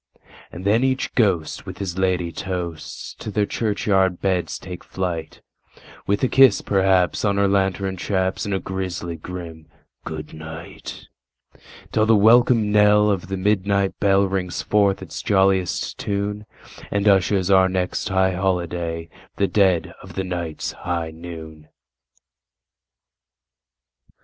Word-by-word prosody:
And 90 +3 -8
then 110 +5 +3
each 130 0 0
ghost 95 -9 0
with - - -7
his 95 -3 -4
ladye 90 -2 0
toast 85 -3 -6
to - - -5
their 105 0 +1
churchyard 95 -4 0
beds 95 -2 -1
take 90 -2 -9
flight, 90 -4 -4 0.7
With 100 +4 0
a - - +5
kiss, 135 +1 +5
perhaps, 95 -2 +2
on 100 -1 +1
her 100 0 +3
lantern 95 -1 0
chaps, 95 0 -1
and 105 - -3
a - - -1
grisly 90 -2 -4
grim 80 -1 -8 0.4
"good 75 -1 -7
night"; 80 +1 -9 0.9
Till 110 0 +2
the 115 - +6
welcome 115 0 +5
knell 105 0 +5
of 100 0 -2
the 95 +1 -3
midnight 100 0 +1
bell 100 -1 +4
rings 95 -2 -2
forth 100 -2 +2
its - - -7
jolliest 95 -2 +1
tune, 105 +1 -3 0.4
And 100 +1 0
ushers 95 -1 +3
our 95 -1 +5
next 90 -1 -2
high 95 -1 +2
holiday—the 85 0 -2
dead 95 -3 +2
of - - -12
the 95 - -1
night's 85 -4 -4
high 85 -2 -3
noon! 80 -2 -10
95 Hz, 130 wpm, -22 LUFS, 90-100 Hz, 0.9 s, the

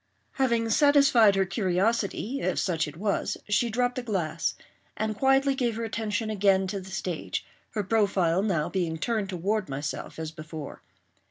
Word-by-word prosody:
Having 235 -4 +1
satisfied 275 -6 +5
her 195 0 +2
curiosity—if 205 +6 0
such 165 -4 0
it 150 +1 -9
was—she 210 +3 0
dropped 245 +2 0
the - - -1
glass, 190 -10 -1 0.4
and 215 0 -1
quietly 270 +3 +3
gave 245 -4 -1
her 230 - -3
attention 220 -1 -2
again 195 -2 +3
to 195 +1 -3
the 190 - -11
stage; 180 -3 -3 0.3
her 210 - 0
profile 190 -4 +2
now 180 -7 0
being 170 -4 -2
turned 215 +2 -1
toward 195 +2 -1
myself, 140 +2 -5
as 160 -1 -4
before. 155 -2 -8
205 Hz, 150 wpm, -27 LUFS, 180-230 Hz, 0.4 s, satisfied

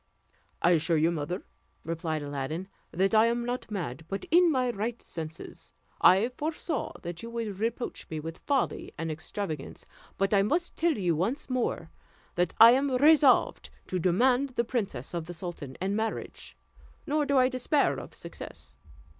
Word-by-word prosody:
"I 175 - +5
assure 165 0 +3
you, 160 +2 +3
mother," 170 +4 -3 0.4
replied 160 -2 -3
Aladdin, 145 +5 -4 0.2
"that 190 +5 +1
I 220 +1 +6
am 235 0 0
not 245 -1 -3
mad, 165 - -4
but 195 -1 -4
in 350 +1 +6
my 255 -3 +1
right 230 +2 -3
senses. 160 0 -8 0.3
I 195 +6 +6
foresaw 305 +1 -3
that 170 -1 -6
you 230 - -7
would 225 -4 -4
reproach 230 +2 -3
me 155 - -4
with 165 +2 -7
folly 275 -3 -1
and 165 -1 -3
extravagance; 155 -1 -5 0.3
but 195 +1 +1
I 200 - +5
must 335 - 0
tell 330 -3 +1
you 175 -5 +1
once 225 - -2
more, 255 -1 -1 0.4
that 175 -1 0
I 230 +1 +11
am 270 +3 +2
resolved 290 -1 +4 0.2
to 185 - -2
demand 245 +9 +2
the 235 - +2
princess 200 - -3
of 170 -2 -3
the 175 - -7
sultan 160 -6 -7
in 195 +2 -1
marriage; 220 +1 -4 0.5
nor 300 +1 +1
do 280 -1 +1
I 255 0 +6
despair 260 +3 +1
of - - -10
success. - - -10
200 Hz, 165 wpm, -28 LUFS, 165-255 Hz, 0.5 s, I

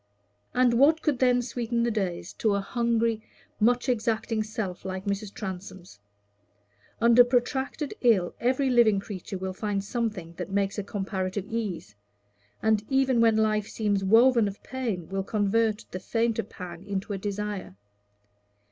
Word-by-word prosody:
And 250 -1 +4
what 315 +4 +5
could 290 -5 +1
then 250 -1 +3
sweeten 235 -1 -2
the 235 - +1
days 185 -5 -3
to 215 -3 +2
a - - +1
hungry, 230 +1 0 0.4
much 245 +4 +3
exacting 225 -2 0
self 215 -4 -4
like 190 +1 -5
Mrs. 200 0 -2
Transome's? 185 - -8 1.0
Under 235 +1 +7
protracted 265 +4 -1
ill 210 -8 +3
every 260 +2 +1
living 225 -5 +5
creature 195 -1 -6
will 190 0 -4
find 200 0 -2
something 210 -6 -3
that - - -5
makes 200 +1 0
a - - -2
comparative 195 -1 -3
ease, 205 - -4 0.7
and 220 -1 +3
even 265 -3 +3
when 225 -1 +4
life 215 -1 +1
seems 205 -3 -1
woven 230 +3 +5
of 200 0 -7
pain, 225 -10 -3
will 195 0 -2
convert 215 +2 +1
the 185 - -4
fainter 225 +3 0
pang 175 -4 -9
into 200 0 -3
a 195 - -3
desire. 205 - -4
215 Hz, 145 wpm, -27 LUFS, 195-235 Hz, 1.0 s, Under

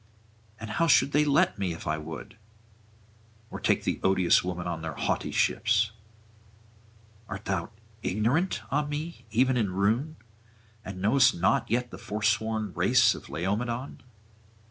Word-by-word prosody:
And 110 -1 -6
how 165 +10 +1
should 140 - +4
they 150 +1 +4
let 140 -7 +2
me, 95 -3 -1
if 80 - -9
I 75 0 -1
would? 80 0 -8 1.2
or - - -6
take - - +1
the - - -1
odious 95 -2 +3
woman 90 -1 -4
on 85 -2 -3
their 80 -3 -5
haughty - - -1
ships? 110 -1 +2 1.4
art 95 +2 -6
thou - - -2 0.3
ignorant, 115 - 0
ah 150 +3 +2
me, 150 +3 -6
even 125 +4 +2
in 110 -5 +1
ruin, 110 +11 0 0.7
and 95 -1 -7
knowest 125 +4 +4
not 90 +2 +1
yet 120 +2 0
the - - -9
forsworn 110 0 -1
race 110 +6 +4
of - - -11
Laomedon? 115 - -3
110 Hz, 145 wpm, -27 LUFS, 95-125 Hz, 1.4 s, should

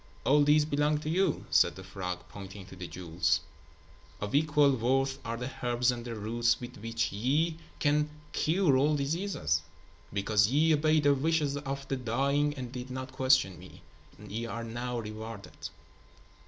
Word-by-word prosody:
"All 145 +2 +5
these 150 +1 +5
belong 150 0 +1
to 155 - -2
you," 180 -2 +1
said - - +4
the 95 - -9
frog, 90 -1 -5
pointing 95 +1 -9
to 95 - -12
the 90 -1 -7
jewels. 85 -1 0 0.8
"Of 105 0 -4
equal 150 -1 +4
worth 135 +3 +1
are 115 0 -3
the 125 +2 -4
herbs 120 0 +2
and 120 -1 -5
the 120 -1 -5
roots 115 +2 +1
with 125 0 -8
which 115 +1 -2
ye 150 +10 0 0.2
can 150 0 +2 0.2
cure 160 -4 +2
all 150 +3 +3
diseases. 140 - 0 0.5
Because 105 +1 +2
ye 155 +6 +3
obeyed 155 0 +3
the 145 0 +5
wishes 145 0 +1
of 140 -1 -4
the 135 - -1
dying 140 +5 +1
and 125 -3 -6
did 125 0 -6
not 130 0 -5
question 130 -8 +2
me, - - -14 0.4
ye 115 +2 -4
are 115 0 -4
now 120 +2 -4
rewarded." 110 -3 -7
130 Hz, 165 wpm, -30 LUFS, 110-145 Hz, 0.8 s, All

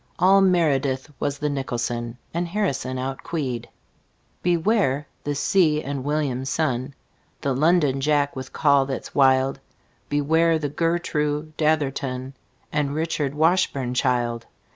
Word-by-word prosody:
All 190 +2 +5
meredith 150 -7 +2
was 145 0 -1
the 150 - -1
nicholson, 120 -3 -3 0.2
And 170 +1 -1
harrison 165 -9 -1
outqueed. 130 -1 -3 0.7
Beware 175 - +1 0.2
the 145 0 -2
see 155 0 +2
enn 140 -1 -3
william, 145 -2 -1
son, 135 -1 -1 0.5
The 140 - 0
londonjack 145 -1 +2
with 130 0 -7
call 140 -3 +3
that's 135 - -5
wild. 135 0 +3 0.5
Beware 160 +3 +2
the 150 -2 -3
gertroo 155 -1 -1
datherton 135 -4 -1 0.4
And 145 -1 0
richardwashburnchild. 135 -7 0
145 Hz, 105 wpm, -23 LUFS, 130-160 Hz, 0.7 s, All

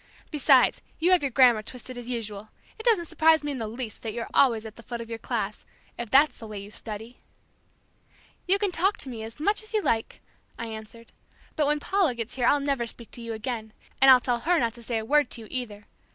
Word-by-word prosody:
Besides 275 -4 +4 0.2
you 345 +3 +2
have 365 - +5
your 280 - 0
grammar 245 -3 +5
twisted 250 +3 -7
as 245 0 -7
usual. 215 -3 -5 0.3
It 445 - -8
doesn't 410 -8 +4
surprise 320 -1 +4
me 295 - -2
in 270 - -4
the 220 - -3
least 225 0 -6
that 220 -2 -4
you're 235 0 -5
always 230 -5 +4
at 220 -1 -9
the - - -12
foot 235 +1 -6
of 230 - -6
the 230 -1 -5
class, 215 -4 -3 0.3
if 235 -2 -5
that's 275 +3 +4
the 225 - -8
way 210 -1 -7
you 200 +1 -8
study." 220 +3 -8 1.3
"You 385 +2 +4
can 400 -2 0
talk 380 +4 +1
to 270 - -2
me 230 -3 -6
as 225 +5 -8
you 430 +5 0
like," 225 -1 -1 0.4
I 230 - -4
answered, 220 +1 -10 0.4
"but 300 -2 +2
when 300 0 +2
Paula 365 -5 +1
gets 230 0 -5
here 245 -2 +1
I'll 290 - +4
never 275 -4 -1
speak 230 0 -8
to 240 - -9
you 230 -1 -5
again, 220 -1 -5 0.3
and 270 - +8
I'll 255 -1 +9
tell 245 -1 -1
her 340 +8 +2
not 235 -6 +1
to 240 - -12
say 230 0 -2
a 220 - -3
word 295 +4 +3
to 235 - -7
you 220 - -10
either. 220 -5 -5
240 Hz, 235 wpm, -26 LUFS, 225-290 Hz, 1.3 s, I'll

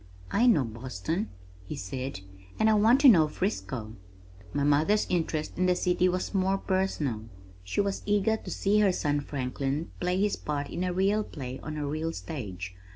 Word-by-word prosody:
"I 235 +4 +4
know 195 - +5
Boston," 130 - -3 0.3
he 95 - -6
said, 130 +3 -5 0.4
"and 220 0 +4
I - - +5
want 225 +5 +5
to 285 - +8
know 170 -11 +7
Frisco." 130 - -3 0.6
My 145 - 0
mother's 150 +9 +3
interest 160 -2 -1
in 185 - +3
the 180 - +3
city 180 0 +2
was 185 +3 -2
more 195 0 +2
personal. 160 - -1 0.4
She 90 - 0
was 200 -1 -2
eager 205 +1 +3
to - - -8
see 205 +2 +2
her 205 -2 +5
son 145 -4 0
Franklin 140 +2 -3
play 180 +1 0
his 205 +1 +1
part 145 -1 -3
in 180 - -2
a 180 - 0
real 195 +4 +2
play 130 -8 -7
on 155 0 -5
a 150 - -2
real 155 +3 -2
stage. 95 - -6
165 Hz, 180 wpm, -28 LUFS, 135-195 Hz, 0.6 s, to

